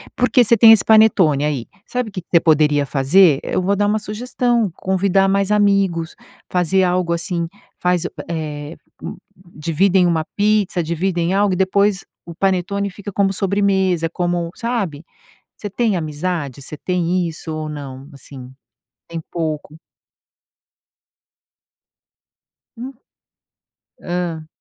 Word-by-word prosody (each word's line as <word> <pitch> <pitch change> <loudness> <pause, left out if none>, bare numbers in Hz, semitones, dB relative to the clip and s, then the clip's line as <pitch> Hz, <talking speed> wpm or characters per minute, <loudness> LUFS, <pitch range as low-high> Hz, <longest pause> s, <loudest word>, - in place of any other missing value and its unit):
Porque 250 0 +3
você 235 +1 +4
tem 225 +1 +8
esse 220 -3 +5
panetone 200 -10 +4
aí 140 -6 -2 0.2
sabe 250 -2 -3
o - - -15
que 185 - -5
que - - -37
você 170 - +6
poderia 150 -3 +3
fazer? 140 +3 +4
Eu - - -1
vou 195 +2 +1
dar 205 +1 +1
uma 215 +1 +1
sugestão, 235 +1 -1
convidar 195 0 +1
mais 195 +1 +1
amigos, 195 -5 +1 0.4
fazer 185 +1 +2
algo 180 -1 +1
assim 170 0 -2 0.3
faz 180 -1 +1
u - - -2 0.2
eh, 155 -1 -5 0.3
u - - -7 0.4
dividem 180 +4 +2
uma 165 -2 0
pizza, 205 -4 +1
dividem 170 +2 -1
algo 200 0 +2
e - - 0
depois 195 +1 +1 0.2
o 170 - -10
panetone 195 +2 0
fica 205 +2 -8
como 195 0 +1
sobremesa, 190 -3 +1
como 175 0 -2
sabe, 205 -11 -3 0.5
você 205 - -6
tem 215 0 0
amizade? 155 -3 -4
Você 150 - -8
tem 180 0 -1
isso 160 0 -7
ou 155 0 -4
não? 140 -2 -8
Assim, 130 -2 -11 0.6
tem 165 - -5
pouco. 155 -2 -4 3.0
Hum. 250 +3 -7 1.1
Hã. 175 -3 -4
180 Hz, 135 wpm, -19 LUFS, 160-200 Hz, 3.0 s, tem